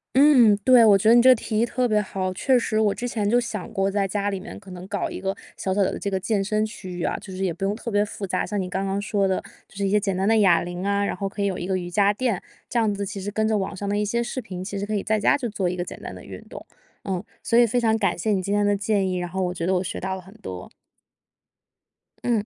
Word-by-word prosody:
嗯， 260 -7 +7
对。 250 -2 +7
我 205 -2 +7
觉 215 +3 +3
得 235 - +7
你 240 - +7
这 - - +5
个 - - +10
提 215 -1 -2
议 235 - +4
特 250 +1 0
别 215 -1 +2
好， 190 -2 -2
确 260 +5 +3
实 220 -2 0
我 210 -2 +3
之 245 - -4
前 215 -4 -1
就 240 +4 +4
想 215 -5 -5
过， 195 0 +1
在 195 0 0
家 205 +1 -1
里 195 - -3
面 - - -9
可 195 -2 -15
能 180 +1 -9
搞 200 -2 -2
一 - - -6
个 195 0 -2 0.2
小 190 - -1
小 200 - +1
的 190 - +1
这 200 - -3
个 190 - 0
健 200 +1 0
身 215 +2 0
区 215 -4 -6
域 - - -2
啊。 - - -1
就 190 - -10
是 190 - -3
也 185 - +1
不 175 +4 -7
用 200 +2 0
特 230 - -6
别 205 -1 +2
复 205 -1 -6
杂， - - -1
像 205 -2 -2
你 180 - -4
刚 195 +2 -2
刚 195 +1 -1
说 205 -1 0
的， 190 - 0 0.3
就 - - -21
是 200 0 -1
一 - - 0
些 210 +1 +3
简 195 -2 -1
单 190 +2 0
的 225 0 +4
哑 190 -5 +5
铃 175 +2 -5
啊， 200 0 +1
然 - - -1
后 200 - -3
可 200 +1 -6
以 200 - +2
有 185 - -2
一 175 - -4
个 190 0 -1
瑜 175 - -6
伽 200 +3 +3
垫， 230 -4 -1 0.3
这 245 - -2
样 215 -2 +2
子 200 - -3
其 200 0 -6
实 205 +2 -4
跟 220 +1 0
着 215 -1 +2
网 195 0 -3
上 200 +2 -4
的 205 - 0
一 210 - +1
些 235 +3 0
视 240 +2 -3
频， 185 -7 -7
其 200 +1 -5
实 200 - -2
可 215 - -4
以 205 - 0
在 215 +1 0
家 - - +4
就 250 -5 -3
做 195 -3 -1
一 180 - -1
个 175 - -2
简 - - -9
单 - - -7
的 - - -11
运 - - -9
动。 - - -9 0.4
嗯， 190 -1 -2 0.2
所 230 - +1
以 240 - +7
非 240 +2 +1
常 220 -1 +2
感 205 - +1
谢 215 +5 -1
你 190 - +1
今 200 +2 -2
天 205 0 +2
的 205 0 +2
建 200 -2 0
议， 180 - -1
然 175 - -2
后 190 +2 -3
我 180 - 0
觉 170 -2 -3
得 190 - +1
我 180 - +1
学 - - -4
到 190 0 -3
了 190 - -8
很 190 +2 -16
多。 90 - -8 1.5
嗯。 225 -4 0
200 Hz, 345 characters per minute, -24 LUFS, 190-215 Hz, 1.5 s, 个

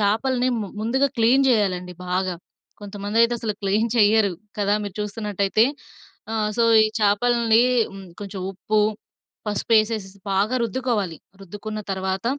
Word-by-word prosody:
చాపల్ని 245 +5 +1
ము 205 - -3
ముందుగా 265 +5 +2
క్లీన్ 250 +4 +4
చేయాలండి 185 -6 0 0.2
బాగా. 185 0 0 0.5
కొంతమందైతే 205 +3 0
అసలు 215 -2 -3
క్లీన్ 205 +3 +1
చెయ్యరు 210 -2 +4 0.3
కదా! 205 0 +1
మీరు 200 -2 -6
చూస్తున్నటైతె. 210 +1 0 0.7
ఆ! - - -2 0.2
సో, 235 - +4 0.2
ఈ - - +3
చాపల్ని 225 +2 +3 0.3
హ్మ్, 195 -1 -10
కొంచెం 200 -1 -6
ఉప్పు, 210 +3 0 0.7
పసుపు 210 +2 -2
వేసేసి 215 -2 +1 0.2
బాగా 205 +6 +1
రుద్దుకోవాలి, 225 -6 -1 0.2
రుద్దుకున్న 210 +3 -7
తర్వాత 190 +1 -2
210 Hz, 125 wpm, -23 LUFS, 195-230 Hz, 0.7 s, క్లీన్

